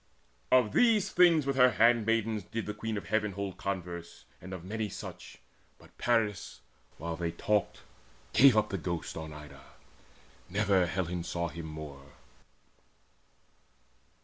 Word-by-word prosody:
Of 125 -5 +5
these 215 -5 +3
things 170 -5 +5
with 135 -1 -1
her 125 -2 +6
handmaids 115 -2 +2
did 115 -1 -4
the 105 - -4
Queen 110 +1 -4
Of 90 -4 -7
Heaven 105 -1 0
hold 100 -1 -5
converse, 85 -3 -5 0.2
and 90 - -9
of 90 -3 -7
many 110 +3 -3
such, - - -9 0.4
But - - -20
Paris, 110 -5 0 0.4
while 85 +2 -4
they 85 0 -2
talked, 105 +3 -1 0.5
gave 130 -4 +7
up 105 0 +2
the 95 - -3
ghost 85 -1 -4
On 80 -1 -6
Ida: 75 0 -11 0.9
never 100 -2 +2
Helen 90 -1 -2
saw 85 0 -3
him 85 -1 -7
more. 75 -3 -9
100 Hz, 140 wpm, -30 LUFS, 85-115 Hz, 0.9 s, gave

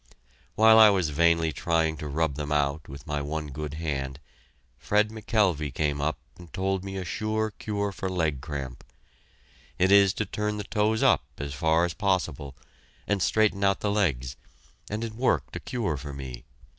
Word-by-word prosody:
While 110 0 +7
I 110 -1 +9
was 95 -6 +1
vainly 85 +1 +3
trying 80 -2 0
to 75 - -6
rub 80 +1 0
them 75 +1 -5
out 75 +1 0
with 70 +1 -10
my 75 -3 -2
one 75 +1 -4
good 75 +1 -5
hand, 70 -4 -3 0.6
Fred 105 +9 +2
McKelvey 100 - 0
came 70 +1 -1
up 75 +1 -1 0.2
and 85 -3 -13
told 95 0 -1
me 95 0 -5
a 95 - -4
sure 110 +2 -1
cure 100 -1 -3
for 95 0 -4
leg 80 -7 -1
cramp. 70 -3 -6 0.9
It 95 +2 +3
is 100 -1 +6
to 110 - -1
turn 105 +2 -2
the 105 - -4
toes 110 +1 0
up - - +4
as 70 -1 -5
far 80 +4 +2
as 85 - -3
possible, 90 -9 -1 0.5
and 100 -2 0
straighten 100 +4 +2
out 100 0 +2
the 105 - 0
legs, 70 - 0 0.5
and 105 +2 -3
it 115 -1 -4
worked 125 +4 0
a - - -3
cure 105 - -2
for 70 +1 -7
me. 65 -3 -8
85 Hz, 180 wpm, -27 LUFS, 75-100 Hz, 0.9 s, I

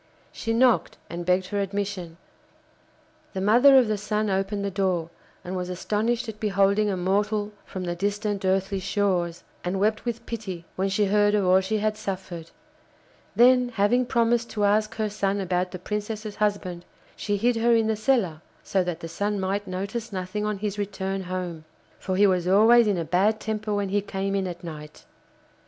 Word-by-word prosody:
She 225 - -4
knocked 245 +1 +3
and 170 0 -5
begged 185 +1 +3
for 205 +2 -3
admission. 195 -4 -3 1.2
The 190 - -3
mother 245 +7 +6
of 255 -3 +5
the 215 -1 -1
Sun 210 0 -1
opened 195 +1 -1
the 200 - -2
door, 180 -4 -1 0.3
and 180 +1 -5
was 180 -1 -3
astonished 220 +6 -1
at 215 -1 -7
beholding 200 0 +2
a 190 - -1
mortal 205 +3 0
from 185 - -6
the 175 -1 -2
distant 205 +2 -2
earthly 190 +1 +1
shores, 185 -3 -1 0.2
and 180 +2 -2
wept 215 +2 +1
with 235 -1 -4
pity 195 -7 -6
when 190 +1 0
she 205 +2 +2
heard 205 +1 +3
of 205 -2 +1
all 185 +1 +5
she 205 +3 -1
had 215 0 -1
suffered. 190 -5 -6 0.9
Then, 250 +1 +5
having 240 +3 +2
promised 235 0 +1
to 210 - -2
ask 215 +2 +2
her 220 -1 -1
son 200 -1 -1
about 180 -1 0
the 185 - -7
Princess's 210 +2 -5
husband, 200 -4 -1 0.3
she 205 -1 -1
hid 235 +3 +2
her 235 +1 +4
in 225 -1 +3
the 220 0 +1
cellar, 215 -8 +1 0.2
so 190 -2 +1
that 175 -2 -4
the 165 - -5
Sun 205 +5 -2
might 195 +2 -2
notice 200 +5 -4
nothing 190 +2 -3
on 210 -1 -2
his 205 0 -3
return 195 -1 -3
home, 180 -3 -4 0.4
for 185 - -2
he 205 +2 +5
was 180 -3 +2
always 220 +4 +6
in 200 -3 +1
a 165 - -2
bad 200 +6 +2
temper 215 0 -3
when 205 -1 0
he 205 +1 +1
came 195 0 -3
in 195 -1 0
at 175 -1 -7
night. 150 -2 -9
200 Hz, 185 wpm, -25 LUFS, 185-215 Hz, 1.2 s, mother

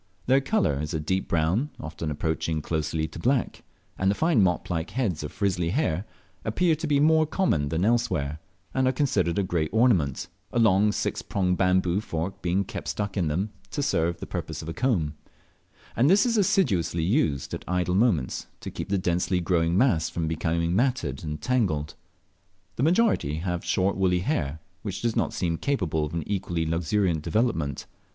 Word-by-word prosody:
Their 135 +2 +4
colour 135 - +1
is 75 +1 -3
a - - 0
deep 95 +5 -1
brown, 85 - +1
often 80 0 -5
approaching 80 +1 -1
closely 80 0 -1
to - - -10
black, 125 +6 0 0.4
and 95 - +2
the 100 - +2
fine 160 -5 +3
mop 90 -2 +1
like 80 0 -2
heads 110 - -1
of 75 - -5
frizzly 90 -4 0
hair 100 - 0 0.4
appear 165 +10 +2
to 160 - -3
be 145 -2 +3
more 155 +1 +4
common 85 - +1
than 80 +4 0
elsewhere, 90 -11 0 0.3
and 130 -1 +2
are - - +4
considered 100 - +1
a 100 - +2
great 85 -4 -1
ornament, 90 - +2 0.2
a - - -2
long 105 -2 +4
six - - -2
pronged 90 -2 0
bamboo 90 0 +2
fork 85 -1 -4
being 90 +3 +1
kept - - -7
stuck 100 -2 -3
in 90 -5 +1
them 95 +8 -1 0.2
to 145 - -2
serve 85 - +1
the - - -5
purpose - - -5
of 80 - -6
a - - -3
comb; 85 - 0 0.8
and 130 +5 +4
this 200 +5 +5
is 235 -2 +1
assiduously 95 - +2
used 80 - 0
at - - -4
idle 90 0 0
moments 95 - +1
to - - -7
keep - - -6
the 100 - +2
densely 90 0 0
growing 85 0 +1
mass 95 - +3
from 85 -2 -2
becoming 85 +2 0
matted 100 - 0
and 75 -1 -5
tangled. 95 - 0 0.8
The - - -3
majority 165 - +2
have 90 +1 -3
short 95 +1 +1
woolly 90 -2 +2
hair, 80 - -2 0.2
which 100 0 -5
does 115 -2 0
not - - +1
seem 85 -2 -1
capable 85 - 0
of 75 - -7
an 85 - -1
equally 90 -5 -1
luxuriant 85 +1 0
development. 80 - -1
90 Hz, 185 wpm, -26 LUFS, 80-115 Hz, 0.8 s, this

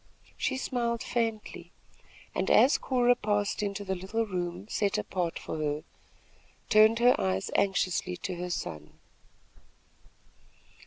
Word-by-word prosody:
She 265 - -1
smiled 235 -3 -1
faintly 225 -3 -3 0.6
and, - - -1
as 270 - +5
Cora 245 -2 +3
passed 205 -2 -1
into 205 0 -3
the 190 - -1
little 195 +5 -2
room 180 -1 -4
set 205 -2 0
apart 175 -3 -2
for 160 - -5
her, 150 0 -2 0.9
turned 215 +1 +6
her 245 +1 +6
eyes 95 0 -1
anxiously 185 -2 +1
to 185 +1 -4
her 180 +1 -4
son. 75 - -5
200 Hz, 120 wpm, -29 LUFS, 180-230 Hz, 0.9 s, turned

